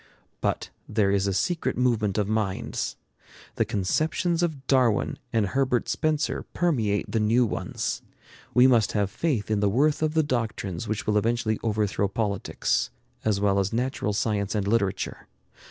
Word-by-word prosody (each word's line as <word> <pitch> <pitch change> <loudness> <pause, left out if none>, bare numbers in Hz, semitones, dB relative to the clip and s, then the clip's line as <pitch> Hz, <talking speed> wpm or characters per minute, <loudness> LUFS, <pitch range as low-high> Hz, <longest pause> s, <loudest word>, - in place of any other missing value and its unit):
But - - -1 0.2
there 105 -2 +2
is 100 0 +2
a - - +1
secret 165 - 0
movement 110 -5 +1
of 105 -2 +1
minds. 105 -3 -2 0.6
The 115 - +2
conceptions 155 - 0
of 155 -6 -2
Darwin 125 -6 +2
and 110 -3 +2
Herbert 125 +3 +1
Spencer 155 -1 0
permeate 115 -13 +1
the 115 - +1
new 115 +3 +3
ones. 110 - -3 0.5
We 125 +1 +7
must 120 -5 +4
have 100 -2 0
faith 120 -7 -1
in 105 - +2
the 100 0 +2
worth 145 +9 +2
of 155 0 0
the 160 - +4
doctrines 110 - -2
which 110 0 -2
will 105 -1 +3
eventually 110 0 0
overthrow 105 -2 0
politics, 100 0 -1 0.3
as 105 -2 +1
well 100 -1 +2
as 95 0 0
natural 125 -2 -1
science 100 -1 -1
and 100 -2 0
literature. 100 -3 -1
110 Hz, 155 wpm, -26 LUFS, 100-130 Hz, 0.6 s, We